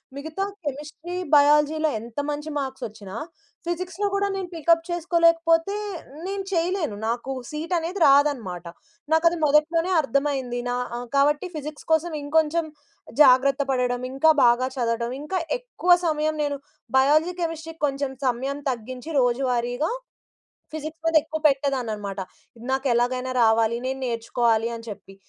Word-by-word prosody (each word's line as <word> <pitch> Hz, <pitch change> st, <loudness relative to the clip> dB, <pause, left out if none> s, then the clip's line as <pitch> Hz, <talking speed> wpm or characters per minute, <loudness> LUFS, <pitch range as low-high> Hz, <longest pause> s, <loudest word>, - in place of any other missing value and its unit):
మిగతా 315 Hz, +7 st, -4 dB, 0.2 s
కెమిస్ట్రీ, 300 Hz, +5 st, -6 dB, 0.2 s
బయాలజీ‌లో 300 Hz, +2 st, +4 dB
ఎంత 230 Hz, +3 st, -7 dB
మంచి 295 Hz, +1 st, -4 dB
మార్క్సొచ్చినా, 220 Hz, -7 st, -6 dB, 0.5 s
ఫిజిక్స్‌లో 360 Hz, +3 st, -2 dB
గూడా 400 Hz, 0 st, +1 dB
నేను 375 Hz, -2 st, -4 dB
పికప్ 330 Hz, +1 st, +2 dB
చేసుకోలేకపోతే, 335 Hz, +1 st, +2 dB, 0.5 s
నేను 395 Hz, 0 st, -3 dB
చెయలేను. 335 Hz, -, 0 dB
నాకు 240 Hz, +3 st, -2 dB, 0.2 s
సీటనేది 335 Hz, +4 st, -2 dB
రాదనమాట. 270 Hz, -, +2 dB, 0.5 s
నాకది 335 Hz, +1 st, +3 dB
మొదట్లోనే 320 Hz, +4 st, +2 dB
అర్థమైంది. 270 Hz, -3 st, -1 dB
నా 245 Hz, -, 0 dB, 0.2 s
ఆహ్, 245 Hz, 0 st, -6 dB
కాబట్టి 290 Hz, +5 st, +2 dB
ఫిజిక్స్ 300 Hz, 0 st, -7 dB
కోసం 325 Hz, +2 st, +1 dB
ఇంకొంచెం 315 Hz, +2 st, +1 dB, 0.6 s
జాగ్రత్త 270 Hz, +1 st, +5 dB
పడడం, 250 Hz, -1 st, 0 dB
ఇంకా 315 Hz, +4 st, +5 dB
బాగా 240 Hz, +2 st, +4 dB
చదవడం, 235 Hz, 0 st, -1 dB
ఇంకా 370 Hz, +5 st, -2 dB, 0.2 s
ఎక్కువ -, -, -1 dB, 0.2 s
సమయం 310 Hz, 0 st, 0 dB
నేను 285 Hz, -1 st, -1 dB, 0.4 s
బయాలజీ, 305 Hz, +6 st, +3 dB
కెమిస్ట్రీ‌కి 325 Hz, -1 st, -5 dB
కొంచెం 275 Hz, -1 st, -3 dB
సమయం 265 Hz, +4 st, -1 dB
తగ్గించి, 250 Hz, +5 st, -7 dB
రోజువారీగా 245 Hz, -, 0 dB, 0.8 s
ఫిజిక్స్ 315 Hz, +1 st, -7 dB
మీదెక్కువ 315 Hz, -1 st, +2 dB
పెట్టేదాన్ననమాట. 245 Hz, -9 st, -1 dB, 0.4 s
ఇది 230 Hz, -, -13 dB
నాకెలాగైనా 255 Hz, -1 st, 0 dB
రావాలి, 225 Hz, 0 st, +3 dB
నేను 265 Hz, +1 st, -3 dB
నేర్చుకోవాలి 230 Hz, -1 st, +1 dB
అని 230 Hz, 0 st, -9 dB
చెప్పి. 195 Hz, -1 st, -9 dB
290 Hz, 120 wpm, -24 LUFS, 245-325 Hz, 0.8 s, జాగ్రత్త